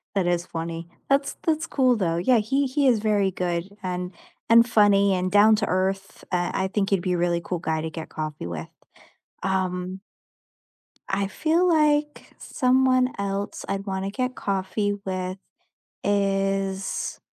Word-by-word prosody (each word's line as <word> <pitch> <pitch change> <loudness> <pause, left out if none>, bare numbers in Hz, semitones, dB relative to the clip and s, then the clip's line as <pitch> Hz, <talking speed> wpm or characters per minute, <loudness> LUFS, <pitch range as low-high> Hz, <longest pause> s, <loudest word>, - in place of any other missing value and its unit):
That 185 -3 +1
is 175 0 0
funny. 165 0 -5 0.2
That's 275 0 +1
that's 320 0 0
cool 255 -3 +3
though. 170 -5 0
Yeah, 240 +8 +3
he 265 +6 +1
he 275 +1 +1
is 235 -4 +4
very 205 -3 +1
good 175 0 -2
and 180 0 -3 0.4
and 230 +1 +7
funny 200 -3 +4
and 185 0 -1
down 210 +2 +6
to 210 - 0
earth. 190 +1 -2
I 180 +1 0
I - - 0
think 200 -1 0
he'd 195 -3 +2
be 180 0 -1
a - - 0
really 170 0 +1
cool 180 -1 -3
guy 160 -1 -1
to 160 - -3
get 160 0 -7
coffee 155 - -5
with. 80 -2 -5 0.8
Um 185 0 -2 1.1
I 195 0 0
feel 325 - +1
like 300 -3 +1
someone 255 0 +2
else 200 0 -3
I'd 195 +1 -2
wanna 195 0 -3
get 255 +3 -2
coffee 200 +1 -1
with 185 0 -3 0.7
is 195 -1 -1
195 Hz, 155 wpm, -24 LUFS, 180-230 Hz, 1.1 s, and